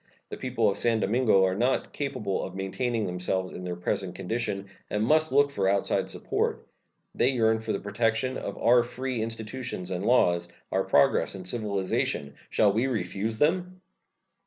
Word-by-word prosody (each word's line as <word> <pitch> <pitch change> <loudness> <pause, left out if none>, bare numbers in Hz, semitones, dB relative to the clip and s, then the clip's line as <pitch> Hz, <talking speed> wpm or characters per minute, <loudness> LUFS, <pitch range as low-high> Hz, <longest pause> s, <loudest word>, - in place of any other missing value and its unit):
The - - -6
people 120 -4 0
of 100 - 0
San 115 -2 +2
Domingo 110 -2 +3
are 95 - +1
not 120 +7 0
capable 130 -9 -2
of 95 - -6
maintaining 110 +4 -1
themselves 90 +1 -2
in 90 - -7
their 90 -1 -3
present 90 +1 -2
condition, 100 0 -3 0.2
and 105 +1 0
must 155 +4 +3
look 140 +1 +4
for 95 -7 +1
outside 100 0 +1
support. - - -2 0.5
They 125 - +3
yearn 110 -4 +2
for 110 - -4
the 100 - -1
protection 115 +4 0
of 100 - -5
our 120 +1 +5
free 125 0 -3
institutions 115 -3 -5
and 90 +1 -2
laws, 90 -7 +3 0.2
our - - +1
progress - - +3
and 95 -1 -5
civilization. 95 -9 -1 0.2
Shall 105 -2 +3
we 115 +5 +1
refuse 110 -1 -2
them? 180 +5 +1
110 Hz, 165 wpm, -27 LUFS, 95-125 Hz, 0.5 s, our